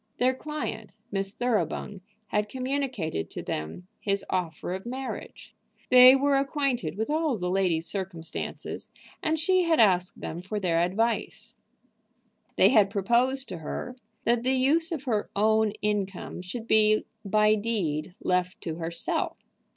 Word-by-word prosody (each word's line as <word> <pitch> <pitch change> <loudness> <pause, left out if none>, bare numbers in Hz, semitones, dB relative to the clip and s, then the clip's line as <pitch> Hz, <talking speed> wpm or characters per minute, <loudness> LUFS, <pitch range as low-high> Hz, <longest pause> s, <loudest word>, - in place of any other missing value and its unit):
Their 255 +1 +3
client 300 -7 -6
Miss 195 -1 -2
Thoroughbung, 210 -4 -1 0.3
had 210 0 0
communicated 255 - -2
to - - -7
them 80 - -5
his 200 -1 -1
offer 175 -1 -2
of 190 +1 -5
marriage. 260 +2 -6 0.4
They 255 +1 +10
were 280 0 +3
acquainted 270 - -1
with 220 +6 -1
all 310 -5 +1
the 180 -1 -2
lady's 180 -4 +1
circumstances, 185 -4 -5 0.3
and 315 0 +1
she 370 +4 +3
had 330 -1 +3
asked 185 -5 +3
them 165 +2 -5
for 205 +3 -4
their 170 -4 +1
advice. 220 +7 -1 1.0
They - - +6
had 210 -6 +5
proposed 240 +7 +1
to 175 - -6
her 245 +10 -5 0.3
that 235 0 +2
the 260 +2 +1
use 310 +6 +3
of 310 -5 -3
her 220 -6 -1
own 215 +1 +3
income 200 -4 -2
should 220 +6 -6
be 215 -1 +4 0.2
by 210 +1 +3
deed 195 -7 -2
left 180 +3 0
to 160 -1 -4
herself. 170 0 -2
210 Hz, 145 wpm, -27 LUFS, 180-255 Hz, 1.0 s, They